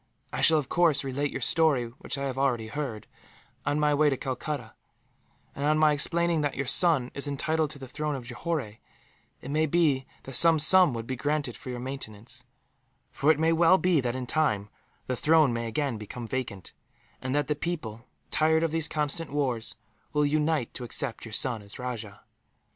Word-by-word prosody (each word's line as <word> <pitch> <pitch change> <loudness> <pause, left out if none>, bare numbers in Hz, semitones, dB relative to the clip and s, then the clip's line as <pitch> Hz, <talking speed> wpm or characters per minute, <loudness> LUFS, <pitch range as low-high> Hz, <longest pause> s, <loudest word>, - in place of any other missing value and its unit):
I - - -2
shall, 160 - +6
of 145 -4 -1
course, 165 -5 +3
relate 140 +2 -2
your 135 - -5
story, 150 -3 +3
which - - -3
I 140 - -3
have 135 -2 -3
already 120 -5 0
heard, 130 -6 -4 0.6
on 145 - +1
my 150 0 +3
return 150 +1 +4
to 135 - -1
Calcutta; 130 -2 -4 0.8
and 140 - -5
on 155 +1 +3
my 155 -1 +5
explaining 170 +2 +1
that 145 -2 -1
your 140 - -2
son 135 -2 +3
is 140 +1 -3
entitled 155 +2 0
to 150 - -9
the 135 -1 -9
throne 150 +3 -3
of 130 -3 -7
Johore, 120 -3 -4 0.6
it 135 - -7
may 155 +2 +2
be 145 -5 +2 0.2
that 135 - -9
some 165 +5 +7
sum 165 -2 +6
would 115 -1 -5
be 130 - -3
granted 145 -1 -2
for - - -10
your 125 -1 -4
maintenance; 120 -4 -8 0.7
for 145 - 0
it 155 - +5
may 160 +1 +2
well 165 +2 +5
be 180 -5 +2
that, 125 -1 -2
in 130 -1 -4
time, 110 -8 0 0.4
the 130 - -2
throne 155 -1 +4
may 115 0 -3
again 125 -1 -2
become 115 +3 -7
vacant, 115 -6 -5 0.5
and 130 +2 -2
that 145 -1 +1
the 150 - -1
people, 130 -8 -5 0.2
tired 160 +1 +3
of 165 - 0
these 160 -1 0
constant 150 +1 -2
wars, 130 -6 -1 0.4
will 150 0 +2
unite 150 -3 0
to 125 - -6
accept 120 0 -3
your 115 - -9
son 120 -1 +1
as 100 0 -11
rajah. 115 -5 -6
140 Hz, 195 wpm, -27 LUFS, 125-155 Hz, 0.8 s, some